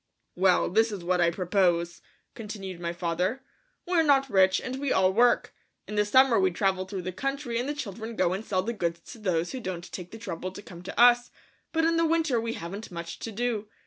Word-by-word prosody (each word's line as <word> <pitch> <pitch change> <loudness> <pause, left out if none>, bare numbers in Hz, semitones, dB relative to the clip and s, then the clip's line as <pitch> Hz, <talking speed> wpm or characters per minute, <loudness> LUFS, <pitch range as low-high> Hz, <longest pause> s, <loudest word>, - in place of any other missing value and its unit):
"Well, 185 0 +3
this 225 +4 +2
is 195 -4 -6
what 180 0 +1
I 170 - +4
propose," 175 -1 0 0.3
continued 200 -5 -7
my 170 -1 -2
father. 180 +8 -2 0.4
"We're 350 -2 +3
not 275 -4 +3
rich 190 -1 +4
and 260 +1 -5
we 280 -1 -1
all 190 0 +3
work. 240 +3 +3 0.3
In - - -7
the 210 0 +2
summer 260 +2 +5
we 190 -1 +3
travel 190 +1 0
through 190 -1 -5
the 185 - -3
country 275 +3 -3
and 255 +4 -2
the 295 - -2
children 225 -3 -6
go 180 -3 +2
and 195 +3 -4
sell 185 -4 -1
the 235 - -2
goods 170 -5 -2
to 230 - -11
those 175 -5 -1
who 260 - -5
won't 180 -4 -6
take 180 -2 -7
the 225 - -9
trouble 185 -3 -5
to 205 - -9
come 175 -3 -11
to 180 - -7
us, 245 0 +6 0.4
but 325 0 +1
in 330 0 +2
the 330 - +3
winter 320 -7 +1
we 230 0 -3
haven't 195 +5 -7
much 170 -1 -7
to 225 - -5
do. 220 -1 -2
200 Hz, 225 wpm, -27 LUFS, 180-245 Hz, 0.4 s, us